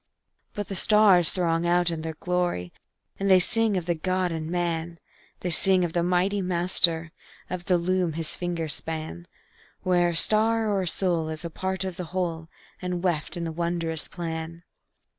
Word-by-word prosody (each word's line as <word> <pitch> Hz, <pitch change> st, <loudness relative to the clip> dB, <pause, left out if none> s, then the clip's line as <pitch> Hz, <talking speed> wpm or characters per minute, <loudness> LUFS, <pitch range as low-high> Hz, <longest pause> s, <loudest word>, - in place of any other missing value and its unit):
But 205 Hz, -1 st, -4 dB
the -, -, -6 dB
stars 195 Hz, -3 st, +5 dB
throng 170 Hz, -2 st, 0 dB
out 175 Hz, 0 st, +2 dB
in 165 Hz, -1 st, -4 dB
their 160 Hz, 0 st, -5 dB
glory, 175 Hz, -, -2 dB, 0.5 s
And 195 Hz, 0 st, -1 dB
they 190 Hz, -1 st, +7 dB
sing 225 Hz, +1 st, +2 dB
of 175 Hz, -, -3 dB
the 175 Hz, -, 0 dB
God 185 Hz, +2 st, -2 dB
in 160 Hz, -1 st, -5 dB
man; 170 Hz, -1 st, -3 dB, 0.4 s
They 180 Hz, -, -3 dB
sing 185 Hz, +1 st, +6 dB
of 165 Hz, -, -5 dB
the 175 Hz, -, +1 dB
Mighty 180 Hz, +3 st, 0 dB
Master, 170 Hz, -2 st, +2 dB, 0.4 s
Of 180 Hz, -1 st, -5 dB
the 180 Hz, -, +2 dB
loom 180 Hz, -1 st, -1 dB
his 160 Hz, 0 st, -4 dB
fingers 170 Hz, -3 st, -2 dB
span, 155 Hz, -, -5 dB, 0.6 s
Where 175 Hz, -1 st, +2 dB
a 170 Hz, -, -4 dB
star 220 Hz, +4 st, +4 dB
or 195 Hz, -1 st, 0 dB
a 185 Hz, -, -3 dB
soul 170 Hz, -2 st, 0 dB
is 155 Hz, +1 st, -6 dB
a 170 Hz, -, -5 dB
part 190 Hz, +3 st, -3 dB
of 185 Hz, -2 st, -5 dB
the 180 Hz, -, -5 dB
whole, 165 Hz, -3 st, -3 dB, 0.3 s
And 180 Hz, -1 st, -4 dB
weft 170 Hz, -3 st, -2 dB
in 170 Hz, -, -4 dB
the 165 Hz, -, -3 dB
wondrous 170 Hz, -1 st, -2 dB
plan. 165 Hz, -1 st, -6 dB
175 Hz, 180 wpm, -25 LUFS, 165-185 Hz, 0.6 s, they